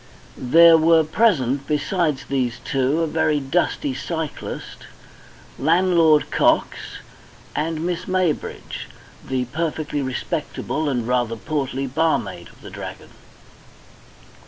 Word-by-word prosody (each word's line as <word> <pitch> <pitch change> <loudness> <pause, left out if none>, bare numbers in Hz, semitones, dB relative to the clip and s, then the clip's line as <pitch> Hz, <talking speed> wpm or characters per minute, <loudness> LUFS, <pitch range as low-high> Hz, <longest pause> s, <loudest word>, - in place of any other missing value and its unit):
There 165 +5 +6
were 165 0 +5
present, 145 - +1
besides 150 -1 0
these 125 -3 -1
two, 135 +4 +1
a - - 0
very 155 -1 +1
dusty 175 - -1
cyclist, 160 - -6 0.7
landlord 165 -1 +3
Cox, - - +2 0.8
and 160 +1 -2
Miss 175 -1 -2
Maybridge, 185 -4 -2 0.4
the 130 -1 -2
perfectly 155 +1 -3
respectable 145 +1 -3
and 120 -4 -1
rather 120 -2 0
portly 135 +1 -3
barmaid 160 +5 -1
of - - -21
the - - -10
Dragon. - - -8
155 Hz, 105 wpm, -22 LUFS, 135-165 Hz, 0.8 s, There